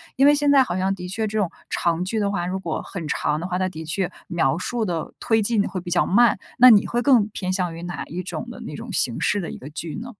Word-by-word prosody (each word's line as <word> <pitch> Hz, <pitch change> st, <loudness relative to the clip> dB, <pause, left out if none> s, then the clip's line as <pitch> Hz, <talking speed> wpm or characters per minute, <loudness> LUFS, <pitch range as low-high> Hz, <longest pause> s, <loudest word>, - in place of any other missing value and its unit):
因 270 Hz, -, +4 dB
为 295 Hz, -, +6 dB
现 290 Hz, 0 st, +2 dB
在 275 Hz, -2 st, +6 dB
好 185 Hz, -7 st, -3 dB
像 190 Hz, +1 st, +1 dB
的 180 Hz, -1 st, -7 dB
确 220 Hz, +4 st, -2 dB
这 215 Hz, +1 st, -3 dB
种 185 Hz, -5 st, 0 dB, 0.2 s
长 170 Hz, +1 st, 0 dB
剧 220 Hz, +3 st, -2 dB
的 200 Hz, -1 st, +1 dB
话， 175 Hz, -3 st, -2 dB
如 190 Hz, +1 st, -2 dB
果 165 Hz, -4 st, -3 dB
很 175 Hz, -5 st, -7 dB
长 150 Hz, 0 st, 0 dB
的 175 Hz, -, -4 dB
话， 180 Hz, -1 st, -2 dB
它 185 Hz, -, +1 dB
的 160 Hz, -3 st, -8 dB
确 175 Hz, +3 st, -1 dB, 0.2 s
描 165 Hz, -4 st, +1 dB
述 230 Hz, +5 st, -2 dB
的 170 Hz, -4 st, -3 dB
推 225 Hz, -1 st, +2 dB
进 215 Hz, 0 st, +2 dB
的 -, -, -2 dB
会 190 Hz, -, -4 dB
比 175 Hz, -, -7 dB
较 175 Hz, 0 st, +3 dB
慢， 235 Hz, +3 st, +4 dB, 0.2 s
那 250 Hz, +1 st, +9 dB
你 215 Hz, -3 st, +6 dB
会 240 Hz, 0 st, -1 dB
更 235 Hz, -5 st, +4 dB
偏 185 Hz, -3 st, -3 dB
向 180 Hz, -3 st, -1 dB
于 170 Hz, -, -8 dB
哪 175 Hz, 0 st, -5 dB
一 175 Hz, +4 st, -5 dB
种 225 Hz, -, -5 dB
的 -, -, -9 dB
那 -, -, -7 dB
种 230 Hz, 0 st, -8 dB
形 120 Hz, -8 st, +1 dB
式 205 Hz, -, +2 dB
的 170 Hz, -, -5 dB
一 -, -, -7 dB
个 140 Hz, -, -10 dB
剧 155 Hz, +1 st, -5 dB
呢？ 240 Hz, +3 st, -7 dB
190 Hz, 310 characters per minute, -23 LUFS, 175-225 Hz, 0.2 s, 那